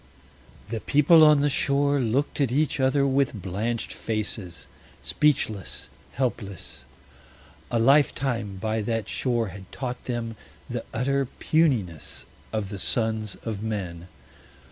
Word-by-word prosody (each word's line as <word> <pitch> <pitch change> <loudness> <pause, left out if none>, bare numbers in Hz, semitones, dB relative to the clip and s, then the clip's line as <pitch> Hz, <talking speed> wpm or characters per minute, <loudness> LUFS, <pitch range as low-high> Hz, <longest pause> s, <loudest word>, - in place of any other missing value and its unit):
The 115 0 -2
people 155 +3 +6
on 150 -2 +7
the 145 - +3
shore 140 +1 +2
looked 130 +5 0
at 135 -4 +2
each 150 +3 +1
other 135 +1 +3
with 135 -4 +1
blanched 105 +6 -2
faces, 105 -6 -3 0.4
speechless, 110 - 0 0.2
helpless. 115 - -3 0.8
A 120 - 0
lifetime 125 -4 +2
by 110 +3 -1
that 115 -1 -2
shore 120 -4 0
had 95 +1 -11
taught 125 -2 -5
them 115 -3 -3 0.3
the - - -4
utter 135 +3 0
puniness 120 - 0 0.3
of 110 -3 -2
the 100 -1 -6
sons 110 -2 0
of 110 -3 -4
men. 90 -6 -4
115 Hz, 120 wpm, -26 LUFS, 105-140 Hz, 0.8 s, on